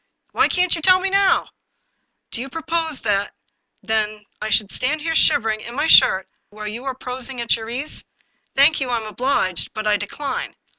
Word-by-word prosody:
" -, -, -47 dB
Why -, -, +3 dB
can't 360 Hz, -1 st, +1 dB
you 330 Hz, -, -6 dB
tell 370 Hz, +2 st, +6 dB
me 385 Hz, +1 st, -2 dB
now? 395 Hz, -1 st, +3 dB, 0.3 s
" -, -, -49 dB
" -, -, -54 dB
Do 230 Hz, -, -4 dB
you 270 Hz, -, -6 dB
propose, 325 Hz, 0 st, -3 dB
then, 205 Hz, -2 st, 0 dB, 0.5 s
that 215 Hz, -1 st, -1 dB, 0.2 s
I 215 Hz, -, -3 dB
should 210 Hz, -2 st, +1 dB
stand 295 Hz, +4 st, -1 dB
here 325 Hz, +1 st, -1 dB
shiver 225 Hz, -7 st, +3 dB
ing 215 Hz, 0 st, -4 dB
in 235 Hz, +2 st, -8 dB
my 290 Hz, -, 0 dB
shirt 190 Hz, -11 st, +6 dB, 0.2 s
while 210 Hz, 0 st, -8 dB
you 230 Hz, +5 st, -7 dB
are 265 Hz, -1 st, -3 dB
prosing 255 Hz, 0 st, -5 dB
at 235 Hz, -1 st, +1 dB
your 225 Hz, -1 st, -7 dB
ease? 265 Hz, +6 st, -2 dB, 0.5 s
Thank 285 Hz, +2 st, +5 dB
you; 260 Hz, -, -2 dB
I 240 Hz, -, +1 dB
am 225 Hz, -, -6 dB
obliged, 215 Hz, -5 st, -1 dB
but 215 Hz, 0 st, -4 dB
I 210 Hz, -1 st, +3 dB
decline. 260 Hz, +7 st, -5 dB
250 Hz, 210 wpm, -20 LUFS, 215-305 Hz, 0.5 s, tell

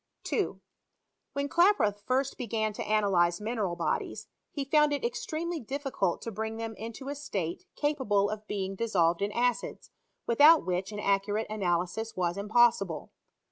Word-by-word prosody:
2, -, -, -1 dB, 0.7 s
When 280 Hz, 0 st, -1 dB
Klaproth 280 Hz, -, +3 dB
first 265 Hz, +1 st, +1 dB
began 220 Hz, -3 st, -2 dB
to -, -, -6 dB
analyze 190 Hz, -5 st, +2 dB
atineral 210 Hz, -5 st, -2 dB
bodies, 170 Hz, -, -2 dB, 0.2 s
he 280 Hz, -2 st, -4 dB
found 300 Hz, +1 st, +4 dB
it 290 Hz, -, -2 dB
extremely 340 Hz, -8 st, -3 dB
difficult 265 Hz, -, -2 dB
to 230 Hz, -, -4 dB
bring 220 Hz, +1 st, -4 dB
them 225 Hz, 0 st, -4 dB
into 230 Hz, +5 st, -7 dB
a -, -, -2 dB
state 210 Hz, -, -4 dB
capable 265 Hz, -10 st, +1 dB
of 215 Hz, 0 st, -6 dB
being; 195 Hz, -2 st, -3 dB
dissolved 185 Hz, -5 st, +1 dB
in 200 Hz, +1 st, 0 dB
acids, 245 Hz, +2 st, -1 dB, 0.3 s
with 235 Hz, +3 st, 0 dB
out 320 Hz, +2 st, +8 dB
which 185 Hz, +2 st, -2 dB
an 210 Hz, -, -5 dB
accurate 205 Hz, +2 st, +1 dB
analysis 195 Hz, +2 st, -1 dB
was 175 Hz, -1 st, 0 dB
impossible. 200 Hz, -5 st, +2 dB
220 Hz, 150 wpm, -29 LUFS, 195-270 Hz, 0.7 s, out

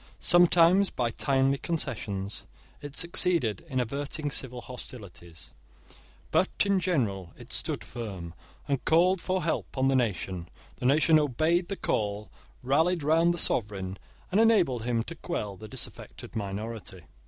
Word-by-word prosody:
Sometimes, 175 Hz, +2 st, +5 dB
by 120 Hz, -2 st, -1 dB
timely 135 Hz, +2 st, +1 dB
concessions, 105 Hz, -, -3 dB, 0.3 s
it 145 Hz, -1 st, -8 dB
succeeded 170 Hz, -, +2 dB
in 130 Hz, -2 st, -1 dB
averting 140 Hz, +4 st, -2 dB
civil 125 Hz, -2 st, -1 dB
hostilities; 100 Hz, -10 st, -7 dB, 0.8 s
but -, -, +3 dB, 0.2 s
in 200 Hz, -1 st, +2 dB
general 105 Hz, -, -1 dB
it -, -, -8 dB
stood -, -, -1 dB
firm, 95 Hz, -8 st, -7 dB, 0.3 s
and 140 Hz, -2 st, -1 dB
called 175 Hz, +3 st, +3 dB
for 185 Hz, -1 st, -1 dB
help 165 Hz, -, -2 dB
on 130 Hz, +1 st, +3 dB
the 135 Hz, -, +2 dB
nation. 95 Hz, -7 st, -1 dB, 0.3 s
The 125 Hz, -, -1 dB
nation 155 Hz, +3 st, +5 dB
obeyed 155 Hz, +5 st, +1 dB
the 195 Hz, -, -4 dB
call, 105 Hz, 0 st, -2 dB, 0.3 s
rallied 160 Hz, +6 st, +2 dB
round 165 Hz, +3 st, +4 dB
the 175 Hz, -, -2 dB
sovereign, 100 Hz, -, 0 dB, 0.3 s
and 200 Hz, +4 st, +4 dB
enabled 175 Hz, -, +3 dB
him 120 Hz, -2 st, 0 dB
to 170 Hz, -, -7 dB
quell 155 Hz, -, -4 dB
the 110 Hz, +3 st, -10 dB
disaffected -, -, -6 dB
minority. 100 Hz, -2 st, -5 dB
130 Hz, 140 wpm, -28 LUFS, 105-170 Hz, 0.8 s, Sometimes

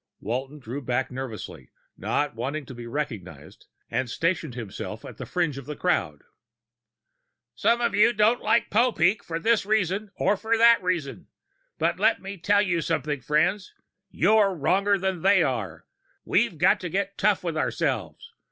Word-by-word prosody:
Walton 130 Hz, +6 st, -4 dB
drew 130 Hz, +1 st, -6 dB
back 125 Hz, 0 st, -1 dB
nervously, 115 Hz, -, -7 dB, 0.3 s
not 145 Hz, 0 st, -1 dB
wanting 135 Hz, +6 st, -4 dB
to 130 Hz, -, -10 dB
be 120 Hz, -1 st, -9 dB
recognized, 115 Hz, -9 st, -6 dB, 0.2 s
and 130 Hz, -2 st, -2 dB
stationed 165 Hz, -1 st, -1 dB
himself 115 Hz, -6 st, -7 dB
at -, -, -10 dB
the -, -, -7 dB
fringe 165 Hz, -6 st, -1 dB
of 140 Hz, -, -12 dB
the 150 Hz, -, -5 dB
crowd. 180 Hz, +3 st, -1 dB, 1.3 s
"Some 235 Hz, +1 st, +1 dB
of 235 Hz, -, +1 dB
you 210 Hz, +3 st, +5 dB
don't 220 Hz, +2 st, +2 dB
like 235 Hz, -, +1 dB
Popeek 215 Hz, -4 st, +2 dB
for 165 Hz, -, -4 dB
this 225 Hz, +6 st, +2 dB
reason 205 Hz, 0 st, 0 dB
or 210 Hz, -, +2 dB
that 230 Hz, +2 st, +4 dB
reason. 175 Hz, -6 st, -3 dB, 0.5 s
But -, -, 0 dB
let -, -, +3 dB
me 195 Hz, +1 st, -8 dB
tell 205 Hz, +4 st, +3 dB
you 175 Hz, -4 st, 0 dB
something, 150 Hz, -4 st, -2 dB
friends... 175 Hz, -, 0 dB, 0.3 s
you're 200 Hz, +1 st, +3 dB
wronger 195 Hz, +6 st, +2 dB
than 190 Hz, -2 st, -2 dB
they 190 Hz, -1 st, +4 dB
are! 100 Hz, -, -3 dB, 0.4 s
We've 205 Hz, -5 st, +1 dB
got 175 Hz, +5 st, +4 dB
to 180 Hz, -, -5 dB
get 200 Hz, +3 st, -2 dB
tough 205 Hz, -2 st, +2 dB
with 170 Hz, -3 st, -3 dB
ourselves! 155 Hz, -, -2 dB
175 Hz, 160 wpm, -25 LUFS, 135-200 Hz, 1.3 s, you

